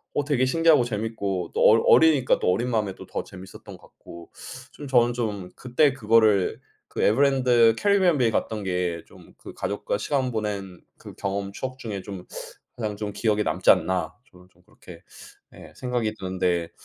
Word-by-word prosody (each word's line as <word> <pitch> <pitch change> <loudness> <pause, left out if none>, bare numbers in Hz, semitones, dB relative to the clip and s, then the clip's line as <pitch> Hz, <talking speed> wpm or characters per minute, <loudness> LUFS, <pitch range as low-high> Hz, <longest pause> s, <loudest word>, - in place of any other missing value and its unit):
어 145 - +1
되게 140 -3 +1
신기하고 160 0 +3
재미있고 105 -5 -3
또 - - -1
어 110 - +7
어리니까 150 -6 +4
또 - - 0
어린 120 +6 -1
마음에 105 -5 -1
또 - - -12
더 - - -4
재미있었던 95 0 -12
것 - - -28
같고 85 0 -14 0.4
좀 145 - -10
저는 120 -2 +3
좀 105 -6 -4
'그때 130 +4 +1
그거를 110 -5 +2 0.3
그 - - -5
에버랜드 125 -2 +3
캐리비안 195 -5 +2
베이 120 -2 +3
갔던 110 -1 -2
게 90 -3 -2
좀 - - -18
그 - - -12
가족과 100 0 -3
시간 130 +3 -1
보낸 100 -4 -4 0.2
그 - - -11
경험 100 0 -4
추억 130 +5 -6
중에 105 -5 -5
좀 95 -3 -9 0.5
가장 110 -3 -4
좀 105 0 -5
기억에 105 0 0
남지 - - +2
않나?' 95 -1 +1 0.2
저는 90 0 -19
좀 90 0 -29
그렇게 90 -1 -15 0.5
예 80 - -13
생각이 120 -1 -2
드는데 90 -2 -2
110 Hz, 340 characters per minute, -24 LUFS, 95-125 Hz, 0.5 s, 어